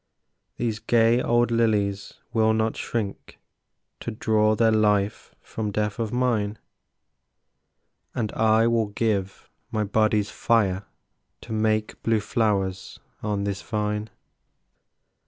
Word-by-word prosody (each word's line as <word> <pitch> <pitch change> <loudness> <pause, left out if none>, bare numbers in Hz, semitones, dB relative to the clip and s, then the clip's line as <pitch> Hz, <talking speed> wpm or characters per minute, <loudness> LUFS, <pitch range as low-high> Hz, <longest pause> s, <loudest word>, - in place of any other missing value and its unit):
These 115 -3 -2
gay 115 +2 +3
old 120 0 +2
lilies 105 -4 0 0.2
will 110 -1 +3
not 110 0 0
shrink 105 -4 -4 0.6
To - - -5
draw 110 -1 +2
their 115 +1 +3
life 105 -2 +1
from 110 -2 -4
death 105 +2 -2
of 110 -2 -2
mine, 115 -4 0 1.6
And 110 -3 -1
I 110 0 +3
will 115 -2 +2
give 100 -2 -2 0.2
my 110 - -1
body's 105 0 +1
fire 100 -4 +1 0.6
To - - -7
make 110 0 0
blue 115 -1 +2
flowers 100 -4 -1 0.2
on 105 -2 -1
this 100 -1 -3
vine. 105 -1 -2
110 Hz, 115 wpm, -25 LUFS, 105-115 Hz, 1.6 s, gay